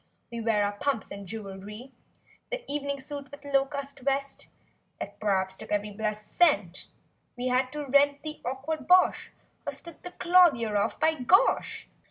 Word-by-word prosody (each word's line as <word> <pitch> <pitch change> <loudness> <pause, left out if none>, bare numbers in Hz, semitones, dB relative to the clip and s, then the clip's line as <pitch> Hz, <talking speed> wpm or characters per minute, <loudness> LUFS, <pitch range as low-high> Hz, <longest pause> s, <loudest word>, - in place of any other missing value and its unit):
We 235 -1 -4
wear 215 -2 +2
our 205 - 0
pumps 240 +3 -2
and 200 -1 -7
jewelry; 210 +4 -8 0.6
The - - -3
evening 280 -1 -2
suit 285 0 -7
with 285 0 -12
low 275 -1 +3
cut 280 0 -6
vest 275 +1 -2 0.5
(That - - -7
p'raps 190 -3 +1
took - - -10
every 210 0 0
blessed 210 0 -4
cent 205 - +3 0.5
We 250 +1 -1
had 255 +1 +1
to 300 -1 -4
rent 280 +1 +3
the 310 0 -6
awkward 270 +3 -4
bosh, 365 +1 +4 0.3
Or - - -3
"stood 340 -2 -8
the 360 - -8
clothier 320 -12 +4
off" 200 - 0
by 320 0 +4
gosh!) 355 - +2
270 Hz, 165 wpm, -28 LUFS, 210-290 Hz, 0.6 s, bosh